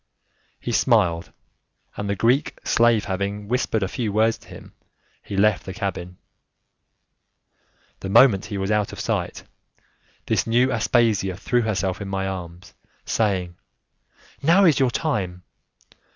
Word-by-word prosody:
He 120 Hz, -, -4 dB
smiled, 105 Hz, -9 st, +2 dB, 0.6 s
and 100 Hz, 0 st, -4 dB
the 100 Hz, -, 0 dB
Greek 125 Hz, +8 st, +1 dB
slave 115 Hz, -2 st, +3 dB
having 100 Hz, +1 st, -3 dB
whispered 115 Hz, -3 st, 0 dB
a -, -, 0 dB
few 110 Hz, +1 st, -3 dB
words 110 Hz, +2 st, +2 dB
to -, -, -20 dB
him, -, -, -12 dB, 0.5 s
he 100 Hz, -, -6 dB
left 105 Hz, -1 st, +3 dB
the 95 Hz, -, -8 dB
cabin. 90 Hz, -4 st, -4 dB, 1.8 s
The 95 Hz, -, -6 dB
moment 105 Hz, -2 st, +5 dB
he 105 Hz, -2 st, -5 dB
was 95 Hz, +1 st, -2 dB
out 105 Hz, -1 st, +1 dB
of -, -, -9 dB
sight, -, -, -3 dB, 0.8 s
this -, -, 0 dB
new 125 Hz, +3 st, +3 dB
Aspasia 110 Hz, -6 st, +1 dB
threw 120 Hz, +4 st, 0 dB
herself 100 Hz, -4 st, -2 dB
in 100 Hz, -, -5 dB
my 95 Hz, 0 st, -2 dB
arms, 90 Hz, -2 st, -7 dB, 0.3 s
saying, 95 Hz, -5 st, -1 dB, 0.8 s
"Now 175 Hz, +7 st, +5 dB
is 160 Hz, -5 st, +4 dB
your 130 Hz, -2 st, +3 dB
time!" 100 Hz, -, -2 dB
105 Hz, 135 wpm, -23 LUFS, 95-115 Hz, 1.8 s, moment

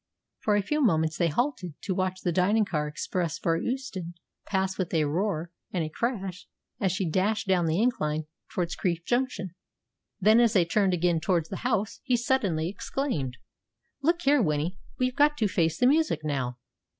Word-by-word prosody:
For 210 Hz, -, +2 dB
a 205 Hz, -, +2 dB
few 300 Hz, +9 st, 0 dB
moments 160 Hz, -, +2 dB
they 170 Hz, -, +3 dB
halted 185 Hz, -, -1 dB
to 190 Hz, -, -1 dB
watch 185 Hz, 0 st, -1 dB
the 175 Hz, -, 0 dB
dining 200 Hz, +5 st, +3 dB
car 150 Hz, -6 st, -1 dB
express 165 Hz, +2 st, -2 dB
for 165 Hz, -, +1 dB
Euston 190 Hz, -5 st, -3 dB, 0.3 s
pass 190 Hz, -1 st, 0 dB
with 185 Hz, -3 st, -2 dB
a 155 Hz, -, +3 dB
roar 170 Hz, +1 st, -1 dB, 0.2 s
and 175 Hz, -3 st, 0 dB
a 155 Hz, -, -3 dB
crash 195 Hz, -2 st, -3 dB, 0.3 s
as 195 Hz, -5 st, +1 dB
she 190 Hz, 0 st, -1 dB
dashed 200 Hz, +6 st, 0 dB
down 180 Hz, -3 st, +3 dB
the 160 Hz, +3 st, +1 dB
incline 155 Hz, -10 st, +1 dB, 0.3 s
towards 175 Hz, -1 st, -1 dB
Crieff 170 Hz, -2 st, -1 dB
Junction. 240 Hz, -7 st, -1 dB, 0.7 s
Then, 215 Hz, +4 st, +6 dB
as 235 Hz, -2 st, +4 dB
they 185 Hz, -5 st, +4 dB
turned 190 Hz, +1 st, +2 dB
again 175 Hz, -1 st, +2 dB
towards 165 Hz, -1 st, 0 dB
the 190 Hz, -, -4 dB
house, 220 Hz, -4 st, -1 dB
he 255 Hz, -3 st, +2 dB
suddenly 205 Hz, -10 st, +1 dB
exclaimed, 175 Hz, -, -3 dB, 0.6 s
"Look 340 Hz, +4 st, +1 dB
here, 285 Hz, -1 st, +4 dB
Winnie. 160 Hz, +1 st, 0 dB, 0.2 s
We've 255 Hz, 0 st, 0 dB
got 295 Hz, +1 st, +4 dB
to 220 Hz, -, +2 dB
face 165 Hz, -3 st, +1 dB
the -, -, +3 dB
music 295 Hz, -, +3 dB
now. 130 Hz, -5 st, -2 dB
185 Hz, 180 wpm, -27 LUFS, 165-230 Hz, 0.7 s, Then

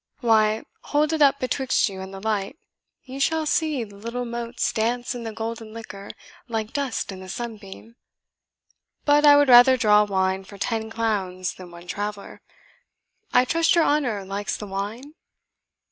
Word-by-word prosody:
Why, 220 Hz, -2 st, +3 dB, 0.2 s
hold 300 Hz, +2 st, +1 dB
it 315 Hz, -, -1 dB
up 280 Hz, -1 st, +5 dB
betwixt 260 Hz, 0 st, +1 dB
you 190 Hz, -2 st, -7 dB
and 190 Hz, 0 st, -8 dB
the 195 Hz, -, -8 dB
light, 210 Hz, +5 st, -2 dB, 0.5 s
you 265 Hz, +1 st, -8 dB
shall 320 Hz, +3 st, +1 dB
see 305 Hz, -4 st, 0 dB
the 205 Hz, -2 st, -12 dB
little 235 Hz, +4 st, -4 dB
motes 235 Hz, 0 st, -3 dB
dance 240 Hz, +3 st, -1 dB
in 245 Hz, -, -6 dB
the 225 Hz, -, -4 dB
golden 225 Hz, 0 st, -6 dB
liquor 200 Hz, -3 st, -9 dB, 0.4 s
like 225 Hz, -2 st, -3 dB
dust 275 Hz, -8 st, -2 dB
in 190 Hz, -, -8 dB
the 185 Hz, 0 st, -10 dB
sunbeam. 220 Hz, 0 st, -8 dB, 1.1 s
But 295 Hz, 0 st, +5 dB
I 290 Hz, -, +9 dB
would 290 Hz, 0 st, +4 dB
rather 255 Hz, +1 st, +8 dB
draw 210 Hz, -3 st, +5 dB
wine 190 Hz, -1 st, 0 dB
for 200 Hz, +1 st, -13 dB
ten 220 Hz, +2 st, -2 dB
clowns 195 Hz, -5 st, -2 dB
than 185 Hz, -1 st, -12 dB
one 170 Hz, 0 st, -13 dB
traveller. 205 Hz, +1 st, -6 dB, 0.9 s
I 250 Hz, -, +4 dB
trust 330 Hz, +5 st, +2 dB
your 335 Hz, -, +4 dB
honour 250 Hz, -11 st, 0 dB
likes 200 Hz, +1 st, -3 dB
the 210 Hz, -, -7 dB
wine?" 210 Hz, +9 st, -5 dB
225 Hz, 165 wpm, -24 LUFS, 200-255 Hz, 1.1 s, I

